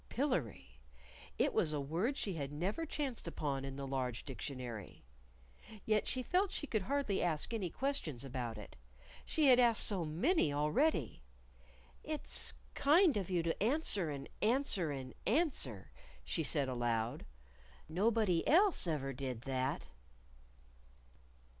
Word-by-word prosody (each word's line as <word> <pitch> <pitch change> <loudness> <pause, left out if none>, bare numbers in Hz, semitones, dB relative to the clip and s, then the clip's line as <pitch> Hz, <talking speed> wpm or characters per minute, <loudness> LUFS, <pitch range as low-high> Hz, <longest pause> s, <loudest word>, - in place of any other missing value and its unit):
Pillery 150 - -2 0.6
it - - +2
was 155 - +1
a 150 - -1
word 170 - -1
she 195 - -1
had 140 -4 -4
never 195 - -2
chanced 275 - -3
upon 140 -4 -2
in 135 0 -5
the 140 0 -5
large 130 -3 -2
Dictionary. 125 -4 -6 0.8
Yet 215 -1 +2
she 255 - -1
felt 370 +8 +2
she 295 - -3
could 220 -7 -1
hardly 260 -2 0
ask 170 +5 -1
any 200 -6 -1
questions 165 - -2
about 120 -4 -4
it. 105 - -10 0.5
She 310 - +2
had 250 -1 +7
asked 235 -3 +6
so 195 -5 0
many 165 - +2
already. 150 - +1 0.8
"It's 305 0 -3 0.2
kind 315 +3 +5
of 195 -3 -2
you 175 -3 +1
to 165 0 -2
answer 215 - +2
and 140 -1 -5
answer 220 - +2
and 130 -3 -5
answer," 225 - 0 0.3
she 115 - -1
said 145 -2 +1
aloud. 120 -2 -1 0.6
"Nobody 195 +1 +2
else 360 - +4
ever 135 -4 -1
did 130 -3 -4
that." 130 +1 -2
165 Hz, 135 wpm, -35 LUFS, -, 0.8 s, had